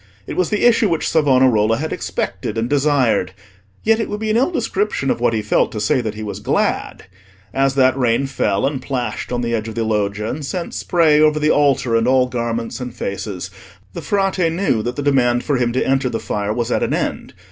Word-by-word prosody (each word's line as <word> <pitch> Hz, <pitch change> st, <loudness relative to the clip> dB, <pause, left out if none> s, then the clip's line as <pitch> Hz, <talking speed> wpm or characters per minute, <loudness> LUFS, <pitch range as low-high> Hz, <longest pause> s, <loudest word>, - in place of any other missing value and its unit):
It -, -, -6 dB
was 185 Hz, -3 st, +1 dB
the 210 Hz, +2 st, +1 dB
issue 230 Hz, -3 st, +4 dB
which 165 Hz, -2 st, -1 dB
Savonarola 130 Hz, -7 st, +3 dB
had 160 Hz, +2 st, -3 dB
expected 110 Hz, -, -4 dB
and 115 Hz, +1 st, 0 dB
desired; 135 Hz, -9 st, +1 dB, 0.5 s
yet 225 Hz, +1 st, +3 dB
it 225 Hz, -, -2 dB
would 210 Hz, -, -4 dB
be 215 Hz, 0 st, -1 dB
an -, -, +1 dB
ill 260 Hz, +7 st, +2 dB
description 210 Hz, -, -1 dB
of -, -, -2 dB
what 120 Hz, -, +3 dB
he 110 Hz, -1 st, -1 dB
felt 105 Hz, -, +1 dB
to 110 Hz, -, -4 dB
say 125 Hz, +6 st, +1 dB
that 110 Hz, -2 st, -4 dB
he 110 Hz, -, -6 dB
was 105 Hz, -, -5 dB
glad. -, -, -1 dB, 0.5 s
As 135 Hz, 0 st, +1 dB
that 130 Hz, -1 st, +4 dB
rain 125 Hz, 0 st, +1 dB
fell, 100 Hz, -7 st, 0 dB
and 135 Hz, -1 st, -2 dB
plashed 125 Hz, -5 st, -4 dB
on 120 Hz, -1 st, -1 dB
the 120 Hz, -1 st, -2 dB
edge 110 Hz, -1 st, -2 dB
of 110 Hz, -, -7 dB
the 115 Hz, -, -1 dB
Loggia, 105 Hz, -1 st, -1 dB
and 145 Hz, +6 st, -4 dB
sent 170 Hz, +5 st, -4 dB
spray 160 Hz, -4 st, +3 dB
over 155 Hz, 0 st, +4 dB
the 150 Hz, 0 st, +2 dB
altar 135 Hz, -5 st, +2 dB
and 115 Hz, +1 st, +2 dB
all 130 Hz, 0 st, +4 dB
garments 115 Hz, -1 st, -3 dB
and 125 Hz, -1 st, -6 dB
faces, 95 Hz, -1 st, -5 dB, 0.4 s
the -, -, -6 dB
Frate 195 Hz, -4 st, 0 dB
knew 165 Hz, -, 0 dB
that 120 Hz, +3 st, -3 dB
the 145 Hz, -, -3 dB
demand 125 Hz, -4 st, +2 dB
for 145 Hz, -3 st, 0 dB
him 120 Hz, -1 st, 0 dB
to 130 Hz, -, 0 dB
enter 135 Hz, -1 st, +1 dB
the 115 Hz, -, -3 dB
fire 105 Hz, 0 st, -3 dB
was 115 Hz, +1 st, -2 dB
at -, -, +1 dB
an -, -, 0 dB
end. -, -, -4 dB
130 Hz, 225 wpm, -19 LUFS, 115-150 Hz, 0.5 s, issue